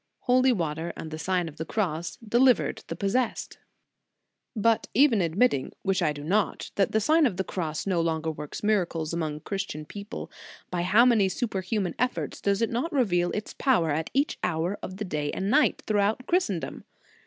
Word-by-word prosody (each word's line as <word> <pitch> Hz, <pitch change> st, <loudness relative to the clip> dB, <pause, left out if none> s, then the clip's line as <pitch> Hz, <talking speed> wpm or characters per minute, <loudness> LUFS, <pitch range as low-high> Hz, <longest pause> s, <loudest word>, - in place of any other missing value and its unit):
Holy 255 Hz, +1 st, +4 dB
water 165 Hz, -5 st, -2 dB
and 160 Hz, -, -7 dB
the 155 Hz, -, -5 dB
Sign 180 Hz, +1 st, 0 dB
of 160 Hz, -1 st, -10 dB
the -, -, -3 dB
Cross 170 Hz, -4 st, -2 dB
delivered 245 Hz, +2 st, +3 dB
the -, -, -4 dB
possessed."* 225 Hz, +5 st, -1 dB, 1.0 s
But 225 Hz, +1 st, +2 dB
even 255 Hz, -7 st, +5 dB
admitting, 170 Hz, -, +1 dB
which 195 Hz, -1 st, +1 dB
I 155 Hz, -3 st, +2 dB
do 145 Hz, -1 st, -7 dB
not, 200 Hz, +6 st, 0 dB
that 195 Hz, -, +1 dB
the 220 Hz, -, +2 dB
Sign 310 Hz, +7 st, +4 dB
of 190 Hz, -7 st, -4 dB
the 190 Hz, -, 0 dB
Cross 160 Hz, -5 st, -3 dB
no 185 Hz, -4 st, +1 dB
longer 160 Hz, -1 st, -1 dB
works 150 Hz, +3 st, -7 dB
mira 205 Hz, -4 st, +3 dB
cles 160 Hz, -1 st, -4 dB
among 155 Hz, -3 st, -3 dB
Christian 195 Hz, -6 st, -4 dB
people, 205 Hz, +7 st, -8 dB, 0.4 s
by 175 Hz, -1 st, -1 dB
how 205 Hz, +7 st, +5 dB
many 220 Hz, -6 st, +4 dB
superhuman 190 Hz, -3 st, -2 dB
effects 250 Hz, +1 st, -2 dB
does 200 Hz, +2 st, +1 dB
it 230 Hz, -, 0 dB
not 250 Hz, +9 st, -1 dB
reveal 180 Hz, -11 st, +2 dB
its 210 Hz, -, -4 dB
power 225 Hz, -, +2 dB
at 155 Hz, +2 st, -1 dB
each 280 Hz, +3 st, 0 dB
hour 175 Hz, +3 st, 0 dB
of 185 Hz, -, -7 dB
the 210 Hz, -, -3 dB
day 150 Hz, -5 st, -2 dB
and 195 Hz, +2 st, -1 dB
night, 300 Hz, +2 st, +3 dB
throughout 210 Hz, +3 st, +1 dB
Christendom? 340 Hz, -, -1 dB
195 Hz, 185 wpm, -27 LUFS, 165-230 Hz, 1.0 s, even